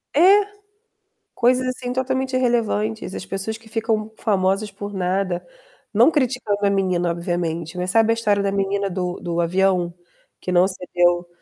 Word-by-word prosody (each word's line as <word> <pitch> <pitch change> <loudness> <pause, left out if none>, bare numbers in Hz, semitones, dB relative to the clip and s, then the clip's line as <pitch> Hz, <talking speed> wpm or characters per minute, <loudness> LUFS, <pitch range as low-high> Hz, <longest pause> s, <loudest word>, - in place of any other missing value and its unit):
É! 300 - +4 1.1
coisas, 255 +1 +2
assim, 255 -1 -3
totalmente 260 +1 -1
irrelevantes. 225 -4 0
As - - -6
pessoas 195 +3 -3
que 225 0 -19
ficam 220 -1 -1
famosas 195 0 0
por 205 0 -7
nada. 185 -1 -1 0.5
Não - - +6
criticando 245 -9 0
a - - +4
menina, 185 -3 +1
obviamente, 170 -1 -3
né. 180 - -1
Sabe 225 +4 +3
a - - +5
história 210 -3 +1
da 200 0 0
menina 200 0 0
do 180 -1 -3
do 170 -1 -3
avião 180 0 +1 0.5
que 180 - -4
não 180 +1 +5
cedeu 175 -2 0
200 Hz, 150 wpm, -22 LUFS, 180-225 Hz, 1.1 s, Não